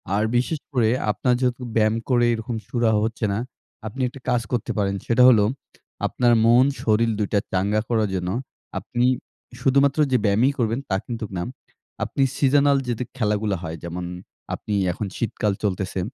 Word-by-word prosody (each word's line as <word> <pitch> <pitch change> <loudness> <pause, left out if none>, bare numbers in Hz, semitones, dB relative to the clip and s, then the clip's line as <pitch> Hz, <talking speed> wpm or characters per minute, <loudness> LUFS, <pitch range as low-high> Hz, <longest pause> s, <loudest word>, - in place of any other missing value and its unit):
আর 105 - +2
বিশেষ 145 +5 0
করে 115 -4 +3 0.2
আপনার 125 +4 +1
যেহেতু 125 0 0
ব্যায়াম 110 -1 +3
করে 120 -2 +4
এরকম 115 +1 -4
সুরাহাঁ 115 -3 +2
হচ্ছে 115 0 -2
না, 100 - -1 0.5
আপনি 130 +5 -6
একটা 130 +2 -9
কাজ 125 -1 +2
করতে 120 -3 -1
পারেন। 100 -1 +1
সেটা 120 +2 +4
হলো 110 -5 +5 0.6
আপনার 120 -1 +2
মন 120 +3 +6 0.2
শরীর 115 +1 +2
২ 105 - +1
টা 100 - +4
চাঙ্গা 100 +3 +1
করার 110 -3 +1
জন্য 90 -1 -2 0.5
আপনি 120 -2 -1 0.6
শুধুমাত্র 140 +2 +3
যে, 125 - +4
ব্যায়ামই 110 +7 +3
করবেন 115 +1 +1
তা 95 - +1
কিন্তুক 115 -3 -5
না। 85 - -1 0.6
আপনি 140 - 0
seasonal 140 0 +4
যে, 120 - +1 0.2
খেলাগুলো 105 -3 0
হয়, 80 0 -5
যেমন 85 +1 -5 0.5
আপনি 105 - -4 0.2
এখন 100 +4 -4
শীতকাল 105 -2 -1
চলতেছে 95 -1 -1
115 Hz, 165 wpm, -23 LUFS, 105-125 Hz, 0.6 s, মন